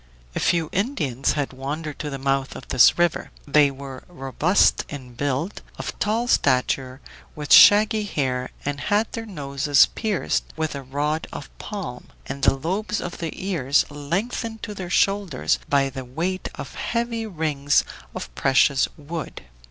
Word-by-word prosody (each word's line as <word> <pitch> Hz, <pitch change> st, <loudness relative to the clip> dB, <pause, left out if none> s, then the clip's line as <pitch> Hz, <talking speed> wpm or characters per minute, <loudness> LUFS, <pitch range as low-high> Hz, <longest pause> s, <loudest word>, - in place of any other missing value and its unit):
A -, -, 0 dB
few 170 Hz, -2 st, +2 dB
Indians 155 Hz, -, 0 dB
had 145 Hz, -3 st, -2 dB
wandered 145 Hz, +3 st, -5 dB
to 150 Hz, -, -3 dB
the 135 Hz, -, -4 dB
mouth 135 Hz, 0 st, -1 dB
of -, -, -9 dB
this 120 Hz, -, +6 dB
river. 175 Hz, -1 st, +1 dB, 0.2 s
They 145 Hz, 0 st, +5 dB
were 135 Hz, -1 st, -9 dB
robust 170 Hz, +4 st, +2 dB
in 130 Hz, -4 st, -8 dB
build, 140 Hz, -, -2 dB, 0.2 s
of -, -, -4 dB
tall 225 Hz, +4 st, 0 dB
stature, 130 Hz, -, +1 dB, 0.3 s
with 150 Hz, -1 st, +1 dB
shaggy 215 Hz, +1 st, +7 dB
hair, 130 Hz, -8 st, -1 dB, 0.2 s
and 145 Hz, 0 st, -2 dB
had 210 Hz, +2 st, +1 dB
their 225 Hz, -1 st, -5 dB
noses 145 Hz, -5 st, +3 dB
pierced 215 Hz, -5 st, -1 dB
with 155 Hz, -1 st, -1 dB
a 140 Hz, -, -5 dB
rod 145 Hz, +4 st, -2 dB
of 140 Hz, -, -9 dB
palm, 190 Hz, -, -6 dB, 0.2 s
and 140 Hz, +1 st, -6 dB
the -, -, +5 dB
lobes 190 Hz, +9 st, -2 dB
of 175 Hz, -, -6 dB
their 165 Hz, -, -2 dB
ears 155 Hz, -8 st, +1 dB
lengthened 200 Hz, +10 st, -3 dB
to 210 Hz, -, -4 dB
their 185 Hz, -3 st, -6 dB
shoulders 195 Hz, -5 st, +1 dB
by 140 Hz, -1 st, +3 dB
the 130 Hz, 0 st, -6 dB
weight 170 Hz, +9 st, -3 dB
of -, -, -8 dB
heavy 235 Hz, -1 st, -2 dB
rings 150 Hz, -6 st, +1 dB, 0.3 s
of -, -, -6 dB
precious 135 Hz, -, +3 dB
wood. 155 Hz, +2 st, -6 dB
150 Hz, 155 wpm, -23 LUFS, 135-195 Hz, 0.3 s, shaggy